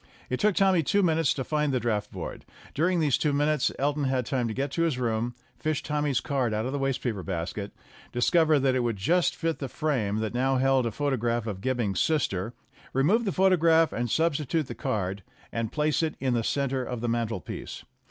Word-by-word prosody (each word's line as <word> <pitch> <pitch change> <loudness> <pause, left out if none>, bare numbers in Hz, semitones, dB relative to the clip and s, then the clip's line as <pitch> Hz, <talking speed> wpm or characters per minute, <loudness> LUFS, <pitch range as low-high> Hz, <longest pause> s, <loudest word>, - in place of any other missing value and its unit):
It 130 - 0
took 210 -2 +3
Tommy 190 -3 +4
two 200 +6 +2
minutes 160 -5 +2
to 130 - -2
find 150 +1 0
that 130 -2 0
draught 110 -3 -1
board. - - -6 0.3
During 175 +4 +1
these 150 -5 +2
two 150 -2 +1
minutes 145 0 +2
Elton 145 +1 0
had 130 -2 0
time 125 -1 -1
to 110 - -3
get 135 +1 -2
to 165 - -1
his 165 -6 +1
room, 120 -1 -1 0.2
fish 155 -2 -1
Tommy's 150 -3 0
card 130 -7 0
out 110 +2 -1
of 130 - -2
the 140 - -2
waste 135 -1 -1
paper 110 -6 -2
basket, 95 +2 -4 0.4
discover 155 +5 +3
that 135 -1 +2
it 130 - +1
would 120 -2 0
just 175 - +2
fit 165 -2 -2
the 135 - -4
frame 125 -10 -1
that 110 0 -2
now 130 +2 +1
held 135 -1 +3
a - - -2
photograph 120 -3 -1
of 100 -4 -5
Gibbing's 120 -7 0
sister, 115 - 0 0.4
re 135 - +2
move 220 +10 +3
the 195 - 0
photograph 165 -4 +4
and 120 0 -2
substitute 155 +1 +1
the 125 - -6
card 100 -3 -2 0.3
and 115 -2 -2
place 150 +1 +1
it 160 -1 -1
in 130 -2 0
the 115 -1 +1
center 135 +1 0
of 125 -2 -5
the 120 - -1
mantelpiece. 115 -5 -3
135 Hz, 210 wpm, -27 LUFS, 115-155 Hz, 0.4 s, Tommy